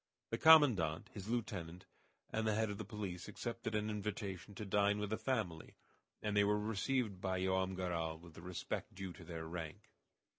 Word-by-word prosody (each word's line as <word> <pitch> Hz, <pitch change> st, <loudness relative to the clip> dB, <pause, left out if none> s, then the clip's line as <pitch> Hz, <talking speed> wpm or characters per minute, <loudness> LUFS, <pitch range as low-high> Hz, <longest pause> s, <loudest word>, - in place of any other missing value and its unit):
The 115 Hz, -, -1 dB
commandant, 125 Hz, -, +6 dB
his 100 Hz, -1 st, -7 dB
lieutenant, 90 Hz, -7 st, -3 dB, 0.5 s
and 110 Hz, 0 st, 0 dB
the 110 Hz, -, +3 dB
head 110 Hz, -1 st, +1 dB
of 100 Hz, -, -5 dB
the -, -, -2 dB
police 100 Hz, -4 st, -5 dB
accepted 110 Hz, +1 st, -4 dB
an 105 Hz, 0 st, +1 dB
invitation 105 Hz, -2 st, -4 dB
to 105 Hz, -, -5 dB
dine 100 Hz, +1 st, +3 dB
with 105 Hz, 0 st, -2 dB
the 110 Hz, -, +1 dB
family, 105 Hz, -12 st, -2 dB, 0.5 s
and 105 Hz, -1 st, 0 dB
they 105 Hz, -, +6 dB
were 105 Hz, +1 st, +3 dB
received 105 Hz, -1 st, 0 dB
by 95 Hz, -1 st, 0 dB
Joam 95 Hz, 0 st, +1 dB
Garral 85 Hz, -3 st, -1 dB
with 85 Hz, 0 st, -13 dB
the 85 Hz, -, -10 dB
respect 90 Hz, 0 st, -4 dB
due 95 Hz, -2 st, -5 dB
to 90 Hz, -, -12 dB
their 80 Hz, -1 st, -5 dB
rank. 80 Hz, -1 st, -6 dB
100 Hz, 185 wpm, -38 LUFS, 90-110 Hz, 0.5 s, commandant